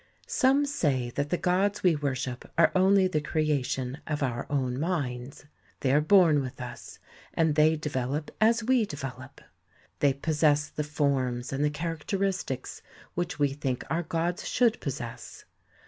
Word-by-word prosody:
Some 275 +1 +3
say 140 - 0
that 145 +3 -2
the 175 - +1
gods 195 +4 +1
we 180 -3 +4
worship 130 -3 -3
are 165 - +5
only 190 +1 +5
the 155 -5 -1
creation 140 -4 -1
of 150 -1 -1
our 120 -3 -2
own 130 -3 -1
minds. 140 -6 -3 0.4
They 130 -1 +2
are 150 - +5
born 160 -3 +5
with 130 0 -7
us, 125 -1 -8 0.4
and 160 -2 +3
they 155 +1 +4
develop 150 -1 -3
as 225 +1 +4
we 250 0 +3
develop. 130 -4 -8 0.6
They 140 -2 +4
possess 150 0 +1
the 150 - -3
forms 135 -4 -1
and 135 +2 0
the 150 - +3
characteristics 165 +1 -3 0.3
which 175 0 -3
we 145 -1 +2
think 135 -2 -3
our 165 - +1
gods 170 +2 -2
should 235 -3 +2
possess. 120 -4 -6
150 Hz, 150 wpm, -28 LUFS, 135-175 Hz, 0.6 s, are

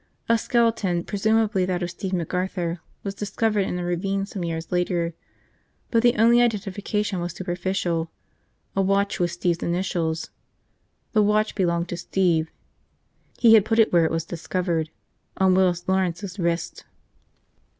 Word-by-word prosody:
A 230 - +4
skeleton, 225 -7 +1
presumably 215 0 +1
that 180 -1 -1
of 175 - -3
Steve 190 +2 -5
McArthur, 180 0 -2 0.2
was 200 - -3
discovered 205 0 0
in 180 - -2
a 180 - -3
ravine 195 +3 -1
some 195 -2 -6
years 165 -1 -4
later, 175 -1 0 0.8
but 230 - +3
the 240 0 +4
only 235 +2 +5
identification 210 -2 -1
was 175 0 -3
superficial, 175 -2 -2 0.7
a 195 - +2
watch 200 +1 +1
with 175 -1 +2
Steve's 175 -1 -1
initials. 170 -2 -1 0.8
The 215 - +4
watch 210 +1 +2
belonged 170 -3 0
to 175 - -4
Steve. 170 -3 +1 0.9
He 230 -2 +6
had 220 -3 +7
put 225 +1 0
it 225 -4 +4
where 170 -2 +5
it - - +1
was 165 0 -1
discovered 170 -1 -2 0.3
– - - -36
on 190 -1 +4
Willis 180 -1 +2
Lawrence's 190 +1 -1
wrist. 170 -1 -2
185 Hz, 150 wpm, -24 LUFS, 175-205 Hz, 0.9 s, had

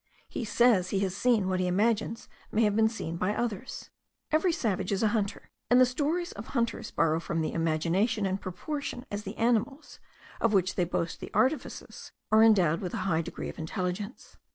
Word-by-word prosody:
He 235 - -4
says 215 -4 +3
he 195 - 0
has 190 -2 -1
seen 225 -3 +2
what 185 -1 0
he 180 - +1
imagines 220 +4 0 0.2
may 225 - +2
have 210 -1 +2
been 220 0 +4
seen 170 -7 -5
by 190 +4 0
others. 235 -1 -4 0.4
Every 315 +4 +3
savage 205 - -1
is 200 +2 0
a 215 - +4
hunter, 205 -3 -2 0.2
and 245 - +6
the 255 - +8
stories 300 +7 -1
of 205 +2 -9
hunters 235 -3 -1
borrow 160 -1 +1
from 165 0 -2
the 155 - -2
imagination 170 +7 +1
in 190 0 -1
proportion 245 - -5
as 205 0 -3
the 195 +3 -6
animals, 240 +5 0 0.4
of 230 -2 +2
which 190 -1 +2
they 180 - +1
boast 170 -1 -2
the - - -7
artifices, 265 +4 -1 0.2
are 220 0 +6
endowed 185 -8 +5
with 185 +3 -4
a 190 -4 -3
high 165 -4 +2
degree 170 - -6
of - - -9
intelligence. 185 +7 -4
205 Hz, 195 wpm, -29 LUFS, 180-235 Hz, 0.4 s, the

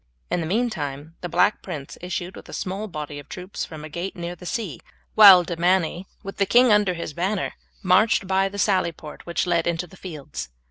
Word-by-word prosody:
In - - +1
the 160 - -3
meantime 160 - -2
the 175 - -4
Black 175 +5 +2
Prince 150 -7 -7
issued 180 0 -4
with - - -12
a - - -9
small 195 +3 -3
body 150 -5 -6
of 145 - -13
troops 185 +2 -5
from 155 -2 -9
a - - -6
gate 170 +5 -5
near 175 0 -5
the 180 +1 -10
sea, 195 - -3 0.3
while 195 -4 +10
De 170 0 -4
Manny, 175 +1 +1 0.2
with 195 - -7
the 200 - +2
king 245 +3 +5
under 205 -3 +3
his 165 -2 -5
banner, 190 +4 -1 0.3
marched 215 +1 +4
by 190 +1 +2
the 200 - -8
sally 190 -3 +2
port 155 -1 -11
which 170 - 0
led 170 -2 +1
into 170 +1 -1
the 180 - -16
fields. 150 - -7
180 Hz, 215 wpm, -24 LUFS, 165-195 Hz, 0.3 s, while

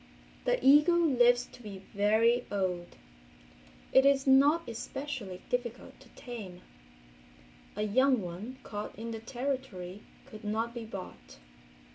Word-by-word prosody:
The - - +3
eagle 295 +5 +7
lives 245 -2 +4
to - - -14
be 200 -4 -9
very 225 +4 +3
old. 180 -3 -2 1.0
It 265 - +7
is 275 -1 +4
not 285 +5 +5
especially 230 -5 -6
difficult 245 -1 -4
to - - -18
tame. 210 -8 -8 1.1
A 210 - -1
young 255 +5 +3
one 195 +7 -7
caught 205 -2 -6
in 230 +2 -5
the 225 - -5
Territory 230 -6 -4 0.2
could 220 -5 -12
not 220 +3 -2
be 235 -2 -6
bought. 185 - -9
235 Hz, 125 wpm, -30 LUFS, 205-265 Hz, 1.1 s, eagle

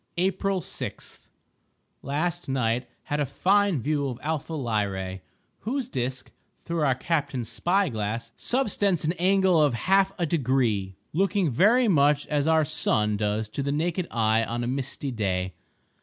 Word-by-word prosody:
April 190 +1 0
6.—Last 150 0 -6
night 125 -2 0
had 145 - -2
a 145 - +2
fine 195 - +2
view 145 -1 0
of 125 -3 -4
Alpha 160 +1 -2
Lyrae, 100 - -2 0.4
whose 255 +2 -3
disk, 130 - -3 0.3
through 170 -1 -3
our 135 -4 +3
captain's 130 -5 -2
spy 175 - +1
glass, 115 -1 -3
subtends 205 - 0
an 160 - +1
angle 190 -2 +4
of 145 -5 +3
half 195 +8 +3
a 175 - 0
degree, 125 - 0 0.2
looking 190 -1 +1
very 225 - +4
much 145 -5 +3
as 145 0 +1
our 160 -1 +4
sun 105 -7 +1
does 105 +1 -1
to 140 - -4
the 140 +1 -1
naked 170 +4 -1
eye 110 -1 +2
on 120 +1 -3
a - - -2
misty 135 +1 -3
day. 95 -5 -1
145 Hz, 145 wpm, -26 LUFS, 115-175 Hz, 0.4 s, angle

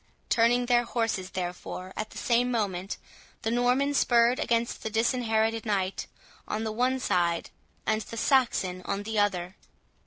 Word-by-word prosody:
Turning 240 +1 +3
their 240 0 +3
horses, 225 -6 -1
therefore, 185 +1 -5
at 215 0 -4
the - - -11
same 245 +1 +2
moment, 195 -5 -2 0.5
the 225 - 0
Norman 250 +4 +2
spurred 240 -2 +4
against 235 -1 0
the 220 - -3
Disinherited 225 0 +1
Knight 195 -3 -1 0.4
on 215 +1 -2
the 220 - -2
one 250 +4 +1
side, 170 -8 0 0.3
and 220 0 +1
the 230 - -8
Saxon 230 -9 +2
on 200 0 -2
the 220 0 -1
other. 185 -2 0
225 Hz, 150 wpm, -28 LUFS, 195-240 Hz, 0.5 s, spurred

